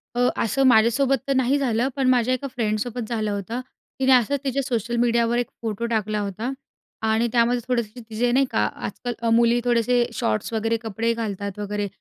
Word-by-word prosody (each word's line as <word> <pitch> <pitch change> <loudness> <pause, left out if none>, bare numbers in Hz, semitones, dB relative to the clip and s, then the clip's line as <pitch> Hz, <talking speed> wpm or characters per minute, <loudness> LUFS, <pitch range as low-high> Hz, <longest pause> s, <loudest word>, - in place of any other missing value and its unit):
अ, 245 +1 +3
असं 265 +5 +1
माझ्यासोबत 255 +3 +4
तर 275 - +2
नाही 260 +2 +2
झालं, 245 -3 +1
पण 270 -2 +1
माझ्या 250 0 +3
एका 255 +2 -3
फ्रेंडसोबत 230 -1 -2
झालं 215 -3 -1
होतं. 205 +5 -4 0.4
तिने 265 0 +3
असंच 255 +3 +3
तिच्या 275 0 0
सोशल 240 -3 -2
मीडियावर 235 0 +2
एक 245 - 0
फोटो 225 0 -3
टाकला 215 -2 -1
होता 210 +5 -3 0.6
आणि 220 +2 +2
त्यामध्ये 240 +1 +2
थोडेसे 235 -2 -2
तिचे 235 +2 0
नाही 270 +2 +3
का, - - +2
आजकाल 245 -1 -5
अ, 230 - 0
मुली 235 +1 +4
थोडेसे 240 0 +2
शॉर्ट्स 110 - -1
वगैरे 225 +1 0
कपडे 225 +2 -1
घालतात 200 -3 -4
वगैरे. 205 0 -2
235 Hz, 180 wpm, -23 LUFS, 220-250 Hz, 0.6 s, माझ्यासोबत